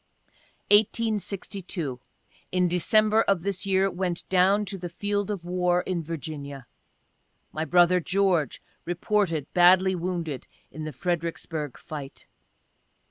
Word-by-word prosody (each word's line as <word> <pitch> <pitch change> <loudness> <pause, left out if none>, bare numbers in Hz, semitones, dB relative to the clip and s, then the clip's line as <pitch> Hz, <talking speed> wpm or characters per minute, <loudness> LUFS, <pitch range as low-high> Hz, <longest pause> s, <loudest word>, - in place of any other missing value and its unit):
1862. 200 - 0 0.3
— - - -34
In 180 -1 +2
December 215 +5 +3
of 195 -6 +1
this 195 0 -2
year 190 0 +3
went 180 -1 -3
down 190 +3 +3
to 200 0 -5
the 175 -2 -6
field 205 +2 -2
of 195 -5 -4
War 180 0 +1
in 180 -2 -2
Virginia. 145 -4 -6 0.9
My 155 +1 -3
brother 180 +1 +4
George 180 -5 0 0.2
reported 175 -3 0
badly 185 +1 +6
wounded 170 -5 -3 0.2
in 155 +2 -6
the 155 - -4
Fredericksburgh 165 -2 -3
fight. 145 -3 -8
180 Hz, 120 wpm, -26 LUFS, 165-195 Hz, 0.9 s, badly